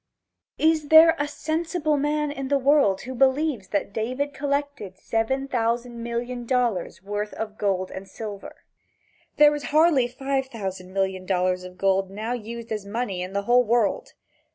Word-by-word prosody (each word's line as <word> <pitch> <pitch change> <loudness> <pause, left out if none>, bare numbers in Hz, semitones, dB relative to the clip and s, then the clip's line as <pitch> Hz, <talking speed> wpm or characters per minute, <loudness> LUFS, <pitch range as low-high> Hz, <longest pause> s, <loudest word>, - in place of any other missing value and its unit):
Is 315 -1 +2
there 325 +1 +8
a 290 - 0
sensible 315 +1 -1
man 295 +1 0
in 275 -2 -5
the 280 +1 +2
world 275 -8 +3
who 260 - -6
believes 265 -4 +1
that 200 0 -2
David 255 +7 -2
collected 280 -9 -3
seven 265 +7 -1
thousand 235 -1 -1
million 240 +1 -4
dollars 235 -8 -1
worth 205 +1 -4
of 215 -1 -5
gold 190 -3 -1
or 190 - -7
silver? 205 0 -9 0.7
There 295 0 +7
is 295 -1 -4
hardly 305 -4 +4
five 270 +2 -2
thousand 190 -6 -6
million 190 -1 -2
dollars 185 -1 +1
of 180 0 -11
gold 195 0 +1
now 215 +5 -4
used 235 0 -7
as 210 -2 -2
money 200 -2 -3
in 185 +1 -5
the 200 0 -1
whole 245 +3 +4
world. 230 -3 0
240 Hz, 160 wpm, -24 LUFS, 200-280 Hz, 0.7 s, there